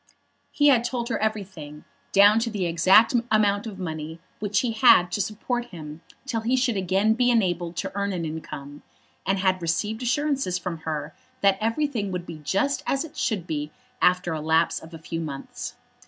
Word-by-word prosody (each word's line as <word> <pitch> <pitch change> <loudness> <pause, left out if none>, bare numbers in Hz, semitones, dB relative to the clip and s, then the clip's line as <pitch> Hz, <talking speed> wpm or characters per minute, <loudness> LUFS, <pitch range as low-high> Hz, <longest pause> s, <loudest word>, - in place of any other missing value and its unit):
He 290 0 +4
had 245 -4 +4
told 240 0 -3
her 230 - -1
everything, 190 -9 -4 0.3
down 205 +2 +6
to 230 +1 -1
the 205 -5 -2
exact 185 +7 +5 0.2
amount 205 0 +2
of 205 -3 -7
money 160 -2 -5 0.2
which 205 -1 +1
he 245 - -1
had 220 -6 +5
to 205 - 0
support 240 +4 -2
him 160 -8 -9 0.2
till 230 -5 -2
he 240 +3 +1
should 250 -3 +1
again 195 +3 +2
be 245 +2 +2
enabled 175 -7 +1
to 190 +2 -3
earn 200 0 -1
an 175 -3 -3
income, 145 -2 -7 0.5
and 195 +1 +2
had 185 -1 +1
received 210 +7 -1
assurances 265 -6 0
from 180 -2 -5
her 150 0 -4 0.3
that 195 -1 +3
everything 230 -3 -1
would 180 -1 -4
be 165 -3 -8
just 195 - 0
as 275 +3 0
it 315 0 -13
should 205 - -1
be 150 -3 -3 0.3
after 180 -2 +3
a 155 - -3
lapse 160 +2 +2
of 160 - -13
a - - -7
few 165 +1 -5
months. 140 -4 -6
195 Hz, 185 wpm, -25 LUFS, 165-225 Hz, 0.5 s, down